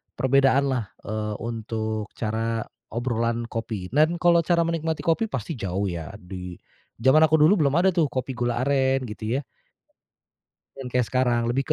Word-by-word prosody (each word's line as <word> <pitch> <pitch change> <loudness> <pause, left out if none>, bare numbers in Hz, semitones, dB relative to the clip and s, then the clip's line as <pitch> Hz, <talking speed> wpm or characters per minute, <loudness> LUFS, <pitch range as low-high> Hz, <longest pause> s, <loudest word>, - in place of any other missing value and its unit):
perbedaanlah, 135 -3 +2
eee, 105 0 -3
untuk 110 -2 -3
cara 115 0 -2 0.2
obrolan 115 0 -1
kopi. 110 -5 -4
Dan 155 +5 +3
kalau 170 0 +4
cara 170 -1 +3
menikmati 165 -1 -2
kopi 170 +7 +1
pasti 135 - -5
jauh, 95 0 -2
ya, 85 +2 -6
di, 90 -2 -8 0.5
zaman 130 +4 +6
aku 155 - +3
dulu 160 +6 +5
belum 140 - 0
ada, 190 - +5
tuh, 170 -4 +2
kopi 130 0 -3
gula 120 0 -1
aren, 135 -1 +2
gitu, 110 -1 -6
ya. - - -7 1.4
Yang 130 -2 -5
kayak 125 -2 +2
sekarang, 125 -2 +1
lebih 135 +3 0
125 Hz, 155 wpm, -25 LUFS, 110-140 Hz, 1.4 s, zaman